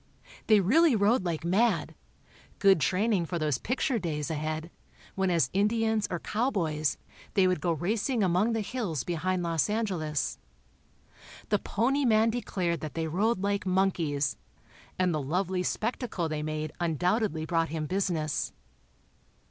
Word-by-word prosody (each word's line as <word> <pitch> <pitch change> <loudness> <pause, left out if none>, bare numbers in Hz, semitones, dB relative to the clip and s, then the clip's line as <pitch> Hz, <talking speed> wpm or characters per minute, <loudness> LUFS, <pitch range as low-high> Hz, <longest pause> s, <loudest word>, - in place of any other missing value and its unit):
They 215 -2 +6
really 285 - +4
rode 210 +1 +3
like 165 -2 -2
mad—good 195 -1 0
training 190 +1 +1
for 175 - -2
those 150 -5 0
"picture" 250 0 0
days 155 -4 -3
ahead, 155 +2 -3 0.4
when 190 -1 0
as 165 -8 +2
Indians, 220 +2 +1
or 175 - -2
cowboys, 165 - -1 0.4
they 195 -2 +5
would 185 -1 0
go 175 - +1
racing 215 - 0
among 190 +5 +2
the 225 - 0
hills 205 - -3
behind 180 +1 -1
Los 165 0 0
Angeles. 185 -9 -1 1.1
The 210 - +2
pony 265 +10 0
man 225 -2 +4
declared 185 -7 -2
that 155 - -6
they 165 -1 -1
rode 195 +5 0
like 200 -1 -1
monkeys, 160 - +1 0.6
and 185 -2 +2
the 155 - -1
lovely 180 +6 -1
spectacle 215 -3 -2
they 155 -1 -3
made 155 0 -3
undoubtedly 175 +1 0
brought 165 -1 0
him 155 0 -3
business. 170 -4 -1
185 Hz, 140 wpm, -28 LUFS, 160-215 Hz, 1.1 s, They